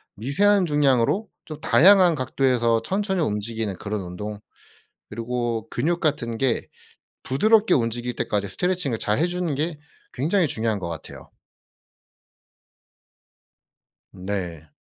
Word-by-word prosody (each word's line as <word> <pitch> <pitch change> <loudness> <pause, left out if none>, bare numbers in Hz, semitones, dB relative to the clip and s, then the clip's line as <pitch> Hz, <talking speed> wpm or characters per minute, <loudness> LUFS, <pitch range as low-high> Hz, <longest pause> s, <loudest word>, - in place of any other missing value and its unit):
미세한 185 - +2
중량으로 145 - +2 0.2
좀 155 -2 -8
다양한 185 0 +6
각도에서 125 -4 +1
천천히 190 - -1
움직이는 110 -4 -2
그런 105 +2 -4
운동 100 +4 -7 0.7
그리고 115 0 -3
근육 170 +2 -1
같은 130 -8 -1
게 130 -2 0 0.6
부드럽게 215 - +3
움직일 120 0 -1
때까지 100 -1 -1
스트레칭을 175 - -1
잘 105 +4 0
해 165 - +3
주는 175 -3 -2
게 155 +3 -2 0.4
굉장히 165 +7 +1
중요한 110 -5 -1
것 85 - -5
같아요. 80 -2 -9 2.8
네. 90 -4 -5
125 Hz, 265 characters per minute, -23 LUFS, 110-170 Hz, 2.8 s, 다양한